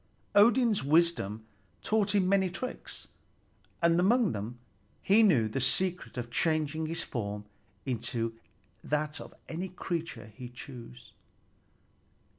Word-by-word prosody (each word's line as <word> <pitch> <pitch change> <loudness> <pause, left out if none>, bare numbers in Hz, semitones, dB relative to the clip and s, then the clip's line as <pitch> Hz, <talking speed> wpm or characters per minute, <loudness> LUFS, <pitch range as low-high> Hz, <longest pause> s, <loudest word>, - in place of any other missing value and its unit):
Odin's 220 - +5
wisdom 145 - +2 0.4
taught 210 -2 +1
him 190 -2 +3
many 190 -1 +3
tricks, 250 +8 -6 0.8
and 170 0 +5
among 220 +3 +4
them 110 +4 -5 0.5
he 205 +3 +5
knew 150 - +5
the 120 +5 -2
secret 180 0 -1
of 120 -1 -4
changing 155 +2 +1
his 165 +1 -3
form 105 -4 -4 0.4
into 115 -2 -2 0.5
that 150 +1 -1
of - - -10 0.2
any 180 +4 -4
creature 165 - -5
he 125 +1 -8
chose. 120 - -11
160 Hz, 115 wpm, -30 LUFS, 120-190 Hz, 0.8 s, Odin's